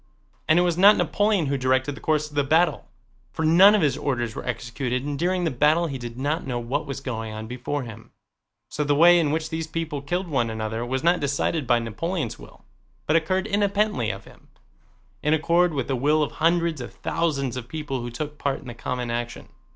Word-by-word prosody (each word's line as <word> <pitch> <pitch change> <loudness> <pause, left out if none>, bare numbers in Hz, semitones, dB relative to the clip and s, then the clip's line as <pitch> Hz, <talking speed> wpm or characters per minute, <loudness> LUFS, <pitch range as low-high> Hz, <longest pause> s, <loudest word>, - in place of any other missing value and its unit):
And 155 - +4
it 175 - +5
was 175 -1 0
not 205 +3 +7
Napoleon 205 -5 +1
who 140 0 -1
directed 130 +2 +1
the - - -11
course 150 -1 +1
of 150 - -16
the 145 - +2
battle, 160 +2 +2 0.4
for 160 - -2
none 185 +6 +7
of 205 - +2
his 140 -3 +2
orders 120 -6 -2
were - - -6
executed 125 +1 -3
and 145 -1 -3
during 180 +1 0
the 165 - 0
battle 150 +6 +3
he 140 -5 -4
did 120 -1 -7
not 145 +5 -1
know 125 -2 -2
what 130 +6 -3
was 135 -1 -4
going 115 -5 -4
on 110 0 -6
before 125 +4 -4
him. 115 -1 -11 0.6
So 150 - -2
the 145 0 +1
way 175 +3 +7
in 155 -3 +1
which 160 +1 -2
these 160 0 -3
people 160 -3 -4
killed 175 +6 -2
one 130 -7 0
another 110 +1 -3
was 130 +3 -2
not 175 +1 +3
decided 140 +1 -1
by 120 -1 +4
Napoleon's 120 - -3
will - - -15 0.4
but 155 - +1
occurred 185 +4 +1
independently 205 - +1
of 95 -1 -6
him, - - -18 0.7
in 150 +1 +3
accord 170 +3 +2
with 135 -5 -2
the 135 - 0
will 150 +5 +2
of 145 - -3
hundreds 165 -3 +1
of 120 - -7
thousands 140 -6 -1
of 125 -2 -6
people 145 -3 -4
who 120 - -5
took 150 +5 -6
part 140 -1 -1
in - - -15
the - - -6
common 125 +1 -4
action. 120 0 -5
145 Hz, 220 wpm, -24 LUFS, 125-165 Hz, 0.7 s, not